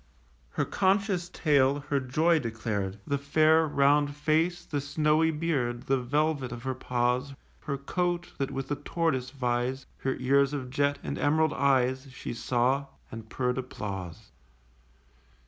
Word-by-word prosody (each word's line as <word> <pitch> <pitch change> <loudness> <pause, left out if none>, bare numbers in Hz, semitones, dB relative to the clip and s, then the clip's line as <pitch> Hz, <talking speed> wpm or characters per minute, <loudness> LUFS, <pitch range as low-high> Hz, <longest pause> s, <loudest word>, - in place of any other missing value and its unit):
Her - - 0
conscious 190 -2 +1
tail 145 -4 +2
her 140 - +2
joy 155 +6 +2
declared; 110 -5 -3
The 140 -1 -1
fair 155 +3 +4
round 145 0 +3
face, 165 +4 +1
the 145 -2 -2
snowy 150 +3 +2
beard, 140 -7 -1
The 135 0 +1
velvet 145 0 0
of 120 -1 -7
her 130 0 -1
paws, 125 +2 -1 0.2
Her 140 -2 -4
coat, 175 +4 -2
that 135 - 0
with 135 0 -5
the 145 - -1
tortoise 145 -4 -1
vies, 125 0 -2
Her 130 0 -1
ears 140 +2 +2
of 130 -3 -4
jet, 145 +1 +1
and - - -4
emerald 155 +1 +2
eyes, 130 -1 +2
She 130 - -6
saw; 125 +4 0 0.2
and 110 -1 -8
purr'd 125 +1 -1
applause. 95 -9 -6
140 Hz, 145 wpm, -28 LUFS, 125-155 Hz, 0.2 s, fair